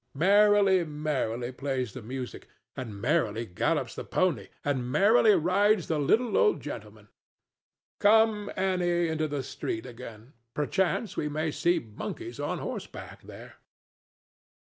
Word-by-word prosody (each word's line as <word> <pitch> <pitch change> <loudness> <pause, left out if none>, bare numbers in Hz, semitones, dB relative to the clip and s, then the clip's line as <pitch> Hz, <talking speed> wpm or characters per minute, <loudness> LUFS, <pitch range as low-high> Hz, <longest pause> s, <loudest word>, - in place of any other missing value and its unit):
Merrily, 200 +2 +5
merrily 145 -6 -2
plays 130 -3 -3
the 130 - -8
music, 125 +3 -7 0.3
and 110 -6 -6
merrily 120 -4 0
gallops 90 - -1
the - - -6
pony, 155 - 0 0.2
and 130 -4 -1
merrily 210 - +5
rides 190 +3 +2
the 160 -2 0
little 220 - +2
old 425 -3 +3
gentleman.—Come, 215 -1 -2
Annie, 175 -2 +1
into 155 -1 -1
the 145 -2 -3
street 110 -2 -5
again; 120 0 -11 0.2
perchance 190 - 0
we 150 - -2
may 155 +1 -2
see 175 +4 +1
monkeys 345 - -7
on - - -2
horseback - - -7
there. - - -12
155 Hz, 125 wpm, -28 LUFS, 125-195 Hz, 0.3 s, Merrily